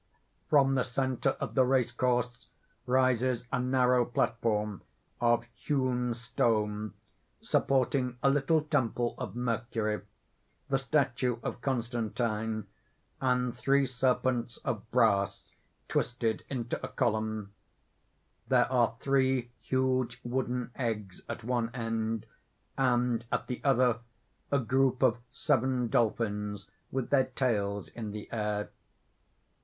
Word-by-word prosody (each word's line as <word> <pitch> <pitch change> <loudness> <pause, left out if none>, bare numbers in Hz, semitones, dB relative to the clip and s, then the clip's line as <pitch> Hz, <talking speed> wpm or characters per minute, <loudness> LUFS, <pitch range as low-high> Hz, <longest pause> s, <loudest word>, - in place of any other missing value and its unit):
From 140 -2 +5
the 130 -2 +2
centre 130 +1 0
of - - -3
the 130 - +5
race 125 -2 +2
course 125 -2 0 0.4
rises 130 -1 +2
a 135 - +1
narrow 125 -1 +3
platform 110 -4 0 0.4
of 120 0 +3
hewn 125 -4 0
stone, 110 -3 0 0.4
supporting 130 -1 +1
a 140 - +6
little 145 +3 +3
temple 125 -5 0
of - - -5
Mercury, 115 -3 -1 0.7
the 135 -1 +2
statue 130 -3 +1
of 120 - -4
Constantine, 115 -3 -1 0.6
and 125 -1 +1
three 135 +2 +3
serpents 125 -1 0
of 110 0 -3
brass 105 -6 +2 0.4
twisted 115 -3 -1
into 125 -3 -3
a - - -2
column; 110 -4 -1 0.9
there - - +3
are 120 -2 +3
three 130 -3 +1
huge 130 -1 0
wooden 125 0 -2
eggs 105 -7 -3
at 120 - -5
one 120 -1 0
end, 115 -2 -2 0.5
and 120 -3 +2
at - - 0
the 125 - -5
other 125 -4 +3 0.5
a 140 - +4
group 130 0 +2
of 120 -2 +4
seven 125 0 +1
dolphins 105 -3 0 0.2
with 130 -2 -3
their 135 -2 +5
tails 100 -6 -1
in 110 -3 -6
the 105 0 -6
air. 105 -2 -1
125 Hz, 115 wpm, -30 LUFS, 115-130 Hz, 0.9 s, a